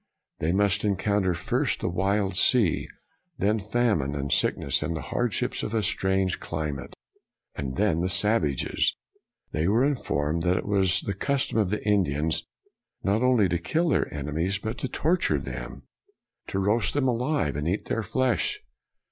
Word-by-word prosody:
They 80 Hz, -, 0 dB
must 100 Hz, +1 st, +2 dB
encounter 100 Hz, -2 st, +1 dB
first -, -, -1 dB
the -, -, -1 dB
wide 95 Hz, +2 st, 0 dB
sea; 105 Hz, -3 st, +3 dB, 0.5 s
then 105 Hz, +3 st, +1 dB
famine 105 Hz, -, 0 dB
and 70 Hz, 0 st, -3 dB
sickness, -, -, +1 dB
and 85 Hz, -, -2 dB
the -, -, -5 dB
hardships 120 Hz, +1 st, 0 dB
of 110 Hz, -, -3 dB
a 110 Hz, -, +1 dB
strange 95 Hz, 0 st, +1 dB
climate, 75 Hz, -5 st, -5 dB, 0.6 s
and 65 Hz, -2 st, -4 dB
then 95 Hz, -4 st, +1 dB
the 90 Hz, -, 0 dB
savages. 90 Hz, -, +1 dB, 0.6 s
They 80 Hz, +2 st, 0 dB
were 115 Hz, +6 st, +3 dB
informed 85 Hz, -, -1 dB
that 90 Hz, +1 st, +2 dB
it -, -, -3 dB
was 95 Hz, -2 st, +3 dB
the 100 Hz, -, -3 dB
custom 130 Hz, +3 st, 0 dB
of 105 Hz, -4 st, +1 dB
the 105 Hz, +1 st, -3 dB
Indians 80 Hz, -6 st, +1 dB, 0.6 s
not 100 Hz, +3 st, +1 dB
only 125 Hz, -6 st, +4 dB
to 85 Hz, 0 st, 0 dB
kill 160 Hz, -, 0 dB
their -, -, +1 dB
enemies, 80 Hz, +6 st, -2 dB
but 110 Hz, +2 st, -5 dB
to -, -, -2 dB
torture 170 Hz, +7 st, +1 dB
them, -, -, -7 dB, 0.6 s
to -, -, -3 dB
roast 105 Hz, +7 st, +1 dB
them 140 Hz, -2 st, +2 dB
alive 125 Hz, -, 0 dB
and 75 Hz, +2 st, -2 dB
eat 95 Hz, +5 st, -1 dB
their 115 Hz, -, -1 dB
flesh. 125 Hz, +4 st, 0 dB
100 Hz, 160 wpm, -26 LUFS, 85-110 Hz, 0.6 s, only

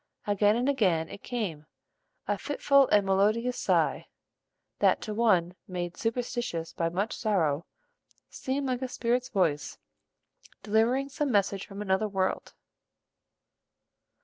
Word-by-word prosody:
Again 205 Hz, +1 st, +3 dB
and 245 Hz, +3 st, 0 dB
again 185 Hz, -, +1 dB
it -, -, -10 dB
came, 180 Hz, -11 st, -4 dB, 0.6 s
a 205 Hz, -, +1 dB
fitful 280 Hz, +3 st, +3 dB
and 205 Hz, -1 st, +3 dB
melodious 215 Hz, +6 st, +1 dB
sigh, -, -, +1 dB, 0.7 s
that -, -, +4 dB
to 215 Hz, -, -4 dB
one 190 Hz, -6 st, +2 dB
made 175 Hz, -2 st, -4 dB
superstitious 230 Hz, -8 st, -3 dB
by 165 Hz, 0 st, -1 dB
much 195 Hz, +6 st, -2 dB
sorrow, 170 Hz, -9 st, 0 dB, 0.6 s
seemed 275 Hz, +2 st, -3 dB
like 255 Hz, -1 st, -1 dB
a 260 Hz, -, -2 dB
spirit's 250 Hz, +1 st, -1 dB
voice 165 Hz, -, 0 dB, 0.9 s
delivering 230 Hz, +6 st, +2 dB
some 280 Hz, +1 st, -1 dB
message 200 Hz, -2 st, +1 dB
from 200 Hz, +1 st, -6 dB
another 190 Hz, +2 st, +1 dB
world. 190 Hz, -2 st, -2 dB
210 Hz, 120 wpm, -28 LUFS, 185-245 Hz, 0.9 s, that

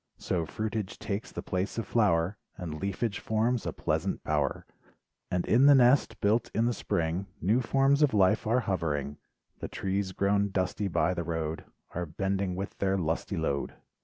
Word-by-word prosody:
So 85 Hz, -3 st, -2 dB
fruitage 110 Hz, -2 st, -3 dB
takes 100 Hz, 0 st, -4 dB
the -, -, -6 dB
place 95 Hz, +3 st, -2 dB
of 115 Hz, -, -1 dB
flower, 100 Hz, -4 st, +2 dB, 0.2 s
And 80 Hz, -4 st, -6 dB
leafage 100 Hz, +2 st, -2 dB
forms 115 Hz, +2 st, 0 dB
a -, -, -1 dB
pleasant -, -, -2 dB
bower, 75 Hz, -2 st, -1 dB, 0.6 s
And 90 Hz, -1 st, 0 dB
in 125 Hz, +5 st, +5 dB
the 145 Hz, -, +8 dB
nest, 130 Hz, +2 st, +4 dB
built 115 Hz, +3 st, +2 dB
in 115 Hz, -, +3 dB
the 120 Hz, -, +2 dB
spring, 85 Hz, -1 st, -1 dB
New 110 Hz, +9 st, +2 dB
forms 135 Hz, +4 st, +3 dB
of 150 Hz, -3 st, +5 dB
life 105 Hz, +2 st, +3 dB
are 120 Hz, +3 st, +3 dB
hovering. 75 Hz, -, -2 dB, 0.4 s
The -, -, -4 dB
trees 95 Hz, 0 st, -2 dB
grown 100 Hz, +1 st, +1 dB
dusty 95 Hz, +2 st, -1 dB
by 90 Hz, 0 st, +1 dB
the 85 Hz, -1 st, -3 dB
road, 80 Hz, -1 st, -3 dB, 0.3 s
Are 90 Hz, 0 st, -3 dB
bending 95 Hz, +3 st, -1 dB
with 95 Hz, +2 st, -5 dB
their 95 Hz, 0 st, +1 dB
lusty 85 Hz, +3 st, -2 dB
load. 70 Hz, -4 st, -1 dB
100 Hz, 170 wpm, -29 LUFS, 85-110 Hz, 0.6 s, the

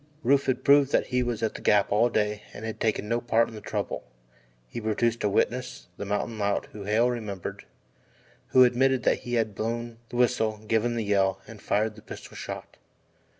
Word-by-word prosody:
Rufe 140 Hz, +3 st, +3 dB
had 130 Hz, 0 st, 0 dB
proven 140 Hz, -1 st, +6 dB
that -, -, +3 dB
he 125 Hz, -, +3 dB
was 120 Hz, -3 st, -2 dB
at 110 Hz, -, 0 dB
the -, -, -8 dB
Gap 105 Hz, -1 st, +3 dB
all 115 Hz, +4 st, +4 dB
day 105 Hz, -2 st, 0 dB
and 105 Hz, -, -7 dB
had 110 Hz, -, -5 dB
taken 110 Hz, -2 st, 0 dB
no 115 Hz, +2 st, 0 dB
part 115 Hz, -1 st, +2 dB
in -, -, -12 dB
the 105 Hz, -, -8 dB
trouble. -, -, -3 dB, 0.6 s
He 115 Hz, -, -6 dB
produced 115 Hz, +2 st, 0 dB
a 105 Hz, -, +2 dB
witness 125 Hz, +1 st, -1 dB
the 100 Hz, -, -5 dB
mountain 105 Hz, +2 st, -2 dB
lout 100 Hz, 0 st, 0 dB
whom 100 Hz, -2 st, -8 dB
Hale 115 Hz, +4 st, +3 dB
remembered 105 Hz, -6 st, -5 dB, 0.8 s
who 130 Hz, -, +6 dB
admitted 125 Hz, +1 st, +3 dB
that -, -, +2 dB
he 120 Hz, 0 st, -3 dB
had 110 Hz, -3 st, 0 dB
blown 115 Hz, +2 st, -4 dB
the -, -, -8 dB
whistle, 120 Hz, -3 st, +2 dB
given 115 Hz, +2 st, +1 dB
the 115 Hz, -, -1 dB
yell, 95 Hz, -2 st, +2 dB
and 105 Hz, -1 st, -11 dB
fired 110 Hz, +1 st, 0 dB
the 105 Hz, -, -13 dB
pistol -, -, -10 dB
shot. -, -, -7 dB
115 Hz, 200 wpm, -27 LUFS, 105-120 Hz, 0.8 s, proven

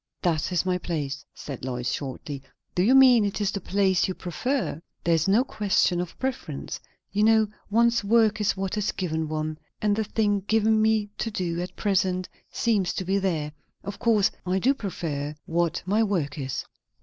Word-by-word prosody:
"That 165 Hz, -1 st, +1 dB
is 180 Hz, 0 st, +1 dB
my 180 Hz, -1 st, +1 dB
place," 145 Hz, -6 st, -3 dB
said 135 Hz, -4 st, -7 dB
Lois 125 Hz, -1 st, -2 dB
shortly. 140 Hz, 0 st, -5 dB, 0.3 s
"Do 180 Hz, -, +1 dB
you 235 Hz, +8 st, +5 dB
mean 255 Hz, -4 st, +7 dB
it 200 Hz, 0 st, -1 dB
is 205 Hz, -1 st, +1 dB
the 200 Hz, -, -4 dB
place 190 Hz, -1 st, +2 dB
you 185 Hz, -, -3 dB
prefer?" 205 Hz, -, -2 dB, 0.2 s
"There 170 Hz, -, +3 dB
is 165 Hz, +1 st, +2 dB
no 210 Hz, +6 st, +4 dB
question 200 Hz, -7 st, +1 dB
of 180 Hz, -, -7 dB
preference. 265 Hz, -1 st, -4 dB, 0.3 s
You 205 Hz, -, 0 dB
know, 220 Hz, 0 st, +5 dB, 0.2 s
one's 235 Hz, +2 st, +3 dB
work 220 Hz, 0 st, +3 dB
is 205 Hz, -1 st, +1 dB
what 195 Hz, +2 st, -2 dB
is 210 Hz, -, 0 dB
given 160 Hz, -4 st, -2 dB
one; 155 Hz, 0 st, -3 dB, 0.2 s
and 210 Hz, -1 st, +2 dB
the 220 Hz, -, 0 dB
thing 205 Hz, -1 st, +1 dB
given 220 Hz, 0 st, +3 dB
me 215 Hz, -1 st, +2 dB
to 225 Hz, -, -1 dB
do, 175 Hz, -5 st, -2 dB
at 180 Hz, -, -6 dB
present, 185 Hz, -2 st, 0 dB, 0.2 s
seems 205 Hz, -6 st, +1 dB
to 190 Hz, -, -3 dB
be 195 Hz, +2 st, +1 dB
there. 160 Hz, -6 st, -1 dB, 0.3 s
Of 200 Hz, 0 st, -6 dB
course 215 Hz, -3 st, +3 dB
I 185 Hz, +1 st, 0 dB
do 255 Hz, +8 st, +3 dB
prefer 155 Hz, -, -4 dB
what 170 Hz, 0 st, 0 dB
my 205 Hz, +4 st, +2 dB
work 170 Hz, -10 st, -1 dB
is." 135 Hz, -1 st, -3 dB
190 Hz, 185 wpm, -26 LUFS, 165-215 Hz, 0.3 s, mean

